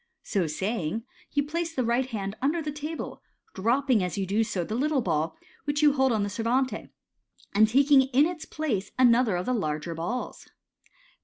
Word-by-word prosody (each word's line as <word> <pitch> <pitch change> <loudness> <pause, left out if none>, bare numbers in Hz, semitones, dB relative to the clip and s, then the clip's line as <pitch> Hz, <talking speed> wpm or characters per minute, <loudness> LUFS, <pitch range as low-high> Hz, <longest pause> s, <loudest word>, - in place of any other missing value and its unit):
So 190 -6 0
saying, 190 +4 -2 0.3
you 285 - +1
place 330 +3 -3
the 255 - +1
right 240 +3 +1
hand 200 -4 -4
under 295 +6 +1
the 300 -2 -3
table, 300 +2 -6 0.3
dropping 240 +3 +2
as 180 +1 -3
you 195 - 0
do 205 +4 +1
so 210 -5 -2
the 215 - -5
little 275 +2 +1
ball 160 -3 -1 0.3
which 290 +1 0
you 295 -1 +6
hold 265 -2 +3
on 215 -3 +1
the 205 - -2
servante, 245 +5 -1 0.6
and 215 +2 +6
taking 275 +4 +5
in 270 +3 +4
its 335 -1 -4
place 255 -12 -2
another 245 -4 +4
of 175 +1 -2
the 255 - 0
larger 155 -6 -2
balls. 175 +10 -4
235 Hz, 180 wpm, -27 LUFS, 195-280 Hz, 0.6 s, you